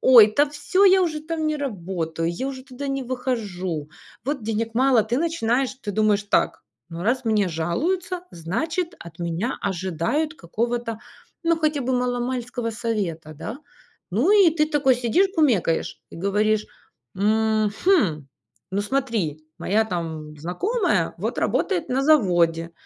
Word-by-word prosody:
"Ой, 230 -5 +8
да 290 0 +5
всё, 300 +6 +1
я 380 -1 +6
уже 310 -4 -1
там 315 0 -2
не 305 - 0
работаю, 170 - -3
я 185 +10 -3
уже 265 -1 -5
туда 275 +1 -7
не 275 0 -2
выхожу, 200 - -3 0.4
вот 275 -3 -2
денег 225 +1 -1
мало". 255 -2 +4
Ты 235 +5 -1
начинаешь, 265 -6 0
ты 210 - -3
думаешь 210 0 +2
так: 205 - +1 0.3
ну, 165 +1 -6
раз 250 +5 +1
мне 210 -4 +2
жалуются, 340 - -1
значит, 320 - -2
от 170 0 -11
меня 170 +8 -2
ожидают 190 - -1
какого-то, 230 - -3 0.4
ну, 335 0 +2
хотя 305 -3 +1
бы 260 +1 -1
мало-мальского 245 -1 -1
совета, 195 -9 -3
да? 215 - -6 0.5
Ну, 255 - +3
и 400 -4 +7
ты 305 - +3
такой 290 -4 +3
сидишь, 245 - +2
кумекаешь 230 - +1
и - - -11
говоришь: 210 +4 +1 0.5
"Мгм, 215 - +2 0.4
ну 200 - +1
смотри, 205 - -1
моя 215 +3 +2
там 160 -6 -5
знакомая 370 - 0
вот - - -3
работает 360 -5 0
на 260 +2 +1
заводе, 175 - +3
230 Hz, 140 wpm, -23 LUFS, 185-285 Hz, 0.5 s, Ой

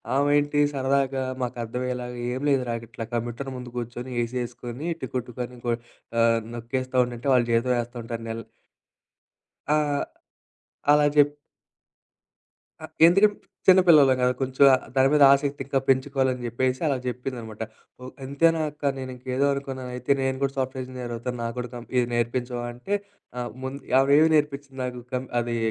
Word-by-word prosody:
ఆమె 145 +1 +3
ఏంటి? 145 0 +1
సరదాగా 135 0 +1 0.2
మాకర్థమయ్యేలాగా 125 +1 -4
"ఏం 130 +2 -3
లేదురా 125 -4 +1 0.2
ఇట్లా 115 -1 -6
కంప్యూటర్ 120 +3 -3
ముందు 125 -1 -8
గూర్చొని 120 +2 -5
ఏసీ 125 +2 -4
ఎసుకొని 120 +5 -7 0.2
టిక్కు 125 -1 -2
టిక్కు 125 +1 -4
అని 125 -1 -14
కొ 120 - +3 0.5
ఆహ్ 115 0 +4 0.2
నొక్కేస్తా 130 +2 -3
ఉండంటే 120 +3 -4
వాళ్ళు 120 -2 +3
జీతం 125 +2 +2
ఏస్తా 120 +1 -12
ఉంటారు 115 0 -6
నెల్" 115 0 -4 1.3
ఆ! 150 - +3 1.2
అలా 150 0 +5
చెప్ 145 0 +5 1.5
ఆహ్, - - -9 0.2
ఎందుకని 200 +4 +5 0.3
చిన్న 185 0 +8
పిల్లలం 140 -5 +7
గదా! 125 0 +3
కొంచెం 130 +1 0
ఆహ్, 130 - -1
దాని 135 0 +5
మీద 150 -1 +5
ఆసక్తి 140 0 +1
ఇంకా 140 -1 +1
పెంచుకోవాలని 130 -1 +2
జెప్పేసి 130 +2 -1
అలా 135 - +1
జెప్పిందనమాట. 120 -3 -5 0.4
ఓహ్! 130 - -8
అంతేనా 160 +4 +2
అక్కా? 145 -1 -2
నేను 130 -1 -5
ఇంకా 125 +1 -15
ఏదో 140 +1 +3
అనుకున్నాను 130 -2 -5
అయితే 125 +3 +1
నేను 130 0 0
కూడా 135 0 +1
సాఫ్ట్‌వేర్ 130 0 -2
ఇంజనీర్ 125 -2 -6
అవుతాను. 125 +1 -4
నాకు 115 +1 -3
కూడా 125 -1 -4
కం 120 0 -8
ఇది 125 -1 +3
నేర్పించవా 120 +1 -1
అంటే, 195 +12 -3 0.7
ముందు 135 +2 -5 0.2
ఆవిడ 135 +1 +3
ఏమి 160 - +4
నేర్పించింది 140 -2 -2
నాకు, 125 -1 -4
కం 130 +1 -1 0.2
అది 120 0 -2
130 Hz, 160 wpm, -25 LUFS, 120-140 Hz, 1.5 s, చిన్న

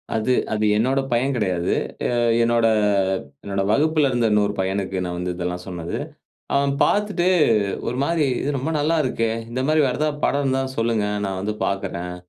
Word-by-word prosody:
அது 110 +3 0 0.2
அது 110 0 0
என்னோட 130 +5 +2
பையன் 125 +4 +1
கிடையாது. 90 -6 0 0.4
அ - - +1 0.3
என்னோட 115 0 +2 0.8
என்னோட 100 -1 -2
வகுப்பில 150 +2 +3
இருந்த 120 -2 +1
இன்னொரு 105 -1 +2
பையனுக்கு 95 0 -1
நான் 90 0 -4
வந்து 90 0 -2
இதெல்லாம் 90 0 -4
சொன்னது. 85 -2 -5 0.6
அவன் 140 0 +2
பார்த்துட்டு 205 -4 +1 0.6
ஒருமாரி 145 +6 0 0.2
இது - - -2
ரொம்ப 140 +5 -2
நல்லா 155 +3 +1
இருக்கே! 115 -4 0 0.2
இந்தமாரி 135 +6 +1
வேற 125 - -1
எதா 155 - +2 0.2
படம் 140 0 +1
இருந்தா 135 0 +1 0.2
சொல்லுங்க. 115 -2 +1 0.2
நான் 95 -1 -3
வந்து 105 +2 -2
பார்க்கிறேன். 90 -2 -3
115 Hz, 155 wpm, -22 LUFS, 95-140 Hz, 0.8 s, வகுப்பில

